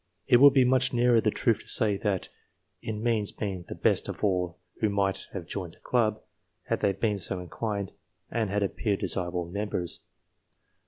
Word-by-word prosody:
It 120 - +6
would 140 +2 +8
be 130 -2 +6
much 130 0 +3
nearer 120 -1 +4
the 110 - +2
truth 115 +1 +1
to - - -13
say, 105 -3 +2
that 100 -3 -1 0.5
it 110 - -4
means 110 -1 0
being 95 -4 -4
the - - -6
best - - +1
of - - -6
all 90 -3 0 0.2
who 110 - +2
might 100 -1 -1
have 95 -4 -5
joined 90 -1 -5
the - - -18
club, 110 -3 +1 0.4
had 115 - -1
they 100 - +2
been 105 -1 0
so 95 0 -2
inclined 100 +2 -4 0.4
and 110 -3 0
had 100 +1 0
appeared 100 +1 -1
desirable 90 -1 -1
members. 90 -1 -2
105 Hz, 180 wpm, -28 LUFS, 95-115 Hz, 0.5 s, would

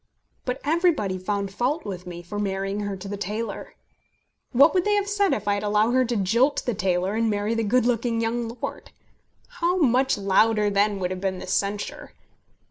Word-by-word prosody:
But 250 +1 -2
everybody 305 - +1
found 200 +1 -2
fault 270 +9 -1
with 185 -3 -6
me 175 -1 -7
for 205 +4 -5
marrying 195 0 -2
her 205 -1 -3
to 190 +1 -8
the 205 +1 -4
tailor. 210 +4 -5 0.8
What 280 +5 +6
would 365 -2 +2
they 415 +1 +2
have 405 -1 0
said 405 -1 +1
if 210 0 -2
I 205 - +3
had 200 - -1
allowed 210 +2 +2
her 255 +1 +3
to 240 0 -2
jilt 235 +8 +2
the 245 - 0
tailor 185 0 0
and 225 +1 +1
marry 205 +1 0
the 230 - 0
good 240 +4 +2
looking 235 -1 0
young 230 +1 -1
lord? - - -5 0.7
How 350 +2 +2
much 265 - +3
louder, 210 +2 +3
then, 200 +1 +2
would 180 -1 -2
have 185 0 -4
been 190 -1 -1
the - - -7
censure! 200 +2 -2
210 Hz, 200 wpm, -24 LUFS, 195-250 Hz, 0.8 s, What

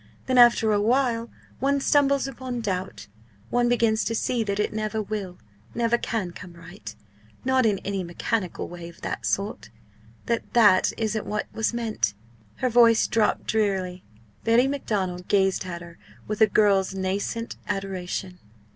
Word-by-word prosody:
Then 255 -1 +3
after 235 -2 +6
a 205 -1 +2
while 235 0 +1 0.3
one 280 +1 +2
stumbles 280 -1 +3
upon 255 -2 -5
doubt 190 -3 -3 0.5
one 240 0 +2
begins 230 -2 +2
to 230 - -1
see 235 +1 0
that 200 -1 -2
it 210 - 0
never 215 0 -2
will, 205 -4 -4 0.4
never 235 0 +2
can 220 -6 -2
come 175 0 -11
right 115 -11 -11 0.5
not 260 -2 +3
in 205 -2 +2
any 195 -1 -2
mechanical 180 +3 -3
way 175 -1 -8
of 170 - -17
that - - -3
sort 200 +3 -2 0.6
that 235 -2 -2
that 205 -6 +5
isn't 220 -1 -2
what 210 0 -2
was 220 - 0
meant!" 220 - -1 0.4
Her 255 - 0
voice 230 -1 +6
dropped 225 -2 +1
drearily. 190 -4 -1 0.4
Betty 230 +3 +4
Macdonald 190 -10 -2
gazed 195 -1 +2
at 170 -1 -5
her 170 -1 -13 0.3
with 215 +1 -3
a 220 - +8
girl's 195 -2 +3
nascent 200 +5 -3
adoration. 190 -2 -4
215 Hz, 155 wpm, -25 LUFS, 190-235 Hz, 0.6 s, a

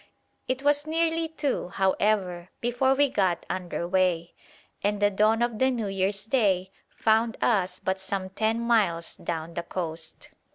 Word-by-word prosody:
It 260 +1 -2
was 290 +1 +2
nearly 325 0 +1
two, 300 - -2
however, 190 -2 0
before 245 +3 +2
we 285 +1 +4
got 190 -8 0
under 175 -2 -3
way, 180 -2 +1 0.5
and 205 0 +1
the 205 0 +3
dawn 215 +3 +3
of 235 -3 -1
the 260 - +4
New 240 -4 -1
Year's 195 +1 -1
Day 195 -6 +1 0.2
found 225 +1 +1
us 185 -5 +1
but 190 0 -1
some 190 0 -4
ten 220 +3 0
miles 205 -8 +1
down 165 0 -4
the 170 - -2
coast. 165 -2 -6
205 Hz, 155 wpm, -27 LUFS, 185-240 Hz, 0.5 s, we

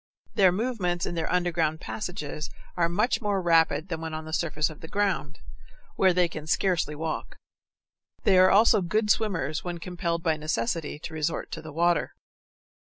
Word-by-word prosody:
Their 190 -3 +5
movements 185 -5 -1
in - - -3
their 165 -2 -2
underground 170 -3 +1
passages 170 -7 -5 0.3
are 170 -1 +2
much 215 +9 +1
more 205 -2 0
rapid 165 -1 +3
than 165 -2 -3
when 160 -1 -4
on 155 0 -6
the 160 - -7
surface 155 -2 0
of 150 - -13
the 160 - -8
ground, 170 -7 -1 0.6
where 190 -1 +4
they 180 0 +3
can 155 -2 -8
scarcely 155 0 +1
walk. 160 +1 -4 0.9
They 190 -2 +5
are 185 0 +7
also 215 +1 +5
good 210 +4 +1
swimmers 175 -9 0
when 175 -1 -4
compelled 170 -1 -3
by 160 -3 +1
necessity 150 0 -2
to 160 +2 -8
resort 155 +1 -2
to 160 - -5
the 155 0 -9
water. 170 +3 +1
170 Hz, 170 wpm, -27 LUFS, 155-185 Hz, 0.9 s, are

